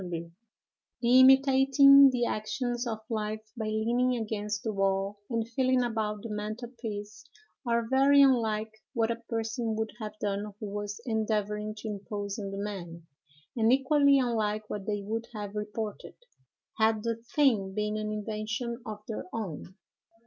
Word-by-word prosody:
The 170 Hz, -2 st, -5 dB, 0.9 s
imitating 270 Hz, +1 st, +7 dB
the 245 Hz, -2 st, 0 dB
actions 240 Hz, +3 st, -2 dB
of 220 Hz, -2 st, -3 dB
life 215 Hz, -1 st, -3 dB
by 225 Hz, -2 st, -4 dB
leaning 235 Hz, +4 st, +1 dB
against 210 Hz, -1 st, -3 dB
the 220 Hz, -, -2 dB
wall 195 Hz, +1 st, 0 dB
and 230 Hz, -2 st, -1 dB
feeling 255 Hz, +1 st, +2 dB
about 215 Hz, -3 st, -2 dB
the 230 Hz, -, -6 dB
mantel 215 Hz, +3 st, -5 dB
piece, 210 Hz, 0 st, -6 dB, 0.4 s
are 235 Hz, -1 st, +1 dB
very 275 Hz, +3 st, +5 dB
unlike 220 Hz, -5 st, +2 dB, 0.2 s
what 230 Hz, 0 st, +1 dB
a 230 Hz, 0 st, -4 dB
person 225 Hz, 0 st, -2 dB
would 220 Hz, 0 st, -2 dB
have 215 Hz, -1 st, -6 dB
done 205 Hz, -1 st, -3 dB
who 210 Hz, -, -5 dB
was 205 Hz, 0 st, -4 dB
endeavoring 215 Hz, -2 st, -1 dB
to 215 Hz, -, -7 dB
impose 205 Hz, 0 st, -5 dB
on 200 Hz, -1 st, -4 dB
the 195 Hz, -, -6 dB
man; 180 Hz, -5 st, -6 dB, 0.5 s
and 225 Hz, -1 st, +3 dB
equally 280 Hz, +1 st, +4 dB
unlike 215 Hz, -4 st, 0 dB
what 200 Hz, -2 st, -5 dB
they 205 Hz, -1 st, -2 dB
would 225 Hz, +3 st, -3 dB
have 205 Hz, -1 st, -5 dB
reported, 210 Hz, 0 st, -5 dB, 0.6 s
had 220 Hz, -1 st, +3 dB
the 230 Hz, -1 st, -1 dB, 0.2 s
thing 220 Hz, -10 st, +3 dB
been 210 Hz, 0 st, -1 dB
an 215 Hz, 0 st, -3 dB
invention 220 Hz, +3 st, -4 dB
of 215 Hz, -3 st, -7 dB
their 220 Hz, -, -5 dB
own. 190 Hz, -4 st, -6 dB
220 Hz, 150 wpm, -29 LUFS, 210-235 Hz, 0.9 s, imitating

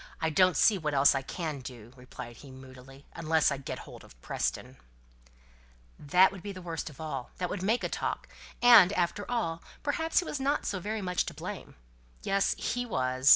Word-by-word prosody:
"I 160 Hz, -, 0 dB
don't 185 Hz, +3 st, +4 dB
see 210 Hz, -3 st, +5 dB
what 150 Hz, -3 st, -2 dB
else 140 Hz, +1 st, +6 dB
I 135 Hz, -, -1 dB
can 155 Hz, +1 st, -4 dB
do," 120 Hz, -2 st, -10 dB
replied 125 Hz, -2 st, -10 dB
he 140 Hz, -, -13 dB
moodily, 130 Hz, +1 st, -13 dB
"unless 160 Hz, -1 st, +2 dB
I 140 Hz, -, -1 dB
get 135 Hz, -, -6 dB
hold -, -, -11 dB
of -, -, -18 dB
Preston." -, -, -3 dB, 1.2 s
"That 180 Hz, +6 st, +5 dB
would 195 Hz, -2 st, -9 dB
be 200 Hz, -, -6 dB
the 185 Hz, -, -8 dB
worst 170 Hz, -3 st, -5 dB
of 150 Hz, -, -15 dB
all. 135 Hz, -6 st, -5 dB
That 180 Hz, -1 st, -2 dB
would 185 Hz, -, -3 dB
make 220 Hz, +6 st, +1 dB
a -, -, +1 dB
talk. -, -, -3 dB, 0.4 s
And, 230 Hz, -7 st, +9 dB
after 180 Hz, +3 st, -1 dB
all, 170 Hz, -9 st, -1 dB, 0.2 s
perhaps 320 Hz, +3 st, -1 dB
he 360 Hz, -, +5 dB
was 295 Hz, -, -4 dB
not 280 Hz, +2 st, 0 dB
so 195 Hz, -, -2 dB
very 210 Hz, +3 st, -3 dB
much 180 Hz, -1 st, 0 dB
to -, -, -6 dB
blame. -, -, -7 dB, 0.5 s
Yes! 195 Hz, 0 st, +1 dB
he 245 Hz, +1 st, -2 dB
was. 130 Hz, -, +1 dB
165 Hz, 200 wpm, -29 LUFS, 135-200 Hz, 1.2 s, And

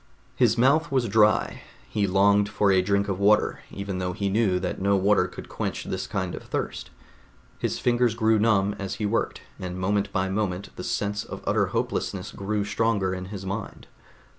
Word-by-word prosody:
His 115 Hz, -2 st, +3 dB
mouth 150 Hz, +7 st, +3 dB
was 130 Hz, -3 st, +1 dB
dry; 105 Hz, 0 st, +3 dB, 0.3 s
he 105 Hz, -2 st, 0 dB
longed 100 Hz, +2 st, +4 dB
for 100 Hz, -1 st, +2 dB
a 95 Hz, -1 st, +4 dB
drink 100 Hz, +1 st, +1 dB
of 95 Hz, -2 st, -2 dB
water, 105 Hz, +1 st, +3 dB
even 100 Hz, -1 st, -5 dB
though 90 Hz, 0 st, -2 dB
he 100 Hz, +2 st, -1 dB
knew 100 Hz, -3 st, +2 dB
that 90 Hz, 0 st, -3 dB
no 100 Hz, +1 st, +3 dB
water 100 Hz, +2 st, +3 dB
could -, -, -10 dB
quench -, -, -4 dB
this -, -, -4 dB
kind 95 Hz, -3 st, -2 dB
of -, -, -6 dB
thirst. -, -, -4 dB, 0.7 s
His -, -, -1 dB
fingers 120 Hz, -2 st, +2 dB
grew 110 Hz, -1 st, +3 dB
numb 105 Hz, -2 st, +3 dB
as 100 Hz, -1 st, -4 dB
he 105 Hz, -, -3 dB
worked, 110 Hz, +3 st, -1 dB, 0.2 s
and 90 Hz, -1 st, -5 dB
moment 100 Hz, +2 st, 0 dB
by 95 Hz, -1 st, 0 dB
moment 95 Hz, -1 st, -3 dB
the -, -, -6 dB
sense 100 Hz, 0 st, -2 dB
of -, -, -9 dB
utter -, -, +2 dB
hopelessness -, -, -2 dB
grew 100 Hz, +1 st, -2 dB
stronger 105 Hz, -3 st, 0 dB
in 90 Hz, 0 st, -5 dB
his 95 Hz, 0 st, -7 dB
mind. 100 Hz, +3 st, -5 dB
100 Hz, 190 wpm, -25 LUFS, 95-110 Hz, 0.7 s, longed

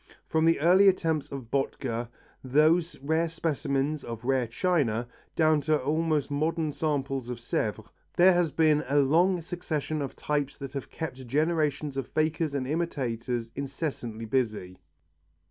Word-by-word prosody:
From 160 Hz, 0 st, +2 dB
the 165 Hz, -2 st, +4 dB
early 180 Hz, +6 st, +6 dB
attempts 165 Hz, -5 st, +2 dB
of 130 Hz, -4 st, -7 dB
Bottger, 120 Hz, -3 st, -1 dB, 0.4 s
those 155 Hz, +6 st, +3 dB
rare 160 Hz, +4 st, +1 dB
specimens 150 Hz, -2 st, -1 dB
of 115 Hz, 0 st, -7 dB
rare 130 Hz, -2 st, +1 dB
china, 120 Hz, -4 st, 0 dB, 0.3 s
down 155 Hz, -2 st, +3 dB
to 155 Hz, 0 st, +2 dB
almost 155 Hz, +1 st, 0 dB
modern 155 Hz, +2 st, 0 dB
samples 135 Hz, -4 st, -2 dB
of 125 Hz, -, -4 dB
Sèvres 110 Hz, -2 st, -2 dB, 0.3 s
there 185 Hz, +2 st, +6 dB
has 175 Hz, -2 st, +2 dB
been 155 Hz, -1 st, +3 dB
a 145 Hz, -, +2 dB
long 170 Hz, +6 st, +3 dB
succession 155 Hz, -3 st, -3 dB
of 140 Hz, -, -4 dB
types 145 Hz, -2 st, -2 dB
that 135 Hz, -1 st, -7 dB
have 140 Hz, -2 st, -5 dB
kept 130 Hz, -5 st, -6 dB
generations 150 Hz, 0 st, 0 dB
of 135 Hz, -2 st, -2 dB
fakers 155 Hz, -1 st, 0 dB
and 135 Hz, -2 st, -1 dB
imitators 125 Hz, -6 st, -2 dB
incessantly 135 Hz, -5 st, -4 dB
busy. 110 Hz, -7 st, -2 dB
145 Hz, 145 wpm, -28 LUFS, 130-160 Hz, 0.4 s, early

